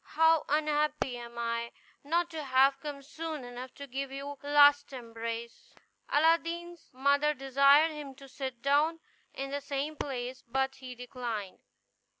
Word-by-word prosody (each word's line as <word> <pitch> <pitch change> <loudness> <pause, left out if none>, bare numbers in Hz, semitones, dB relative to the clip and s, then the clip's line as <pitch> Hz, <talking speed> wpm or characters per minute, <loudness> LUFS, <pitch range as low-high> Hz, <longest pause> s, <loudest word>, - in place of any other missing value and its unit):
how 320 0 +5
unhappy 300 -3 +1
am 235 0 -9
I, 235 0 -2 0.3
not 335 +4 0
to 315 -2 -5
have 270 +1 +4
come 285 -2 -7
soon 315 0 -6
enough 245 +1 -8
to 280 - -8
give 270 +1 -4
you 275 +1 -6
one 285 0 -6
last 290 0 +5
embrace!" 230 -2 -7 0.3
Aladdin's 335 +2 +1
mother 280 +3 +2
desired 275 +4 +5
him 290 -3 -8
to 275 +1 -13
sit 260 -2 -6
down 300 +4 +3 0.4
in 275 0 -4
the 285 0 -2
same 280 +2 -3
place, 255 -3 -4
but 265 +2 -1
he 255 -1 -9
declined. 240 -5 -5
275 Hz, 150 wpm, -30 LUFS, 255-300 Hz, 0.4 s, how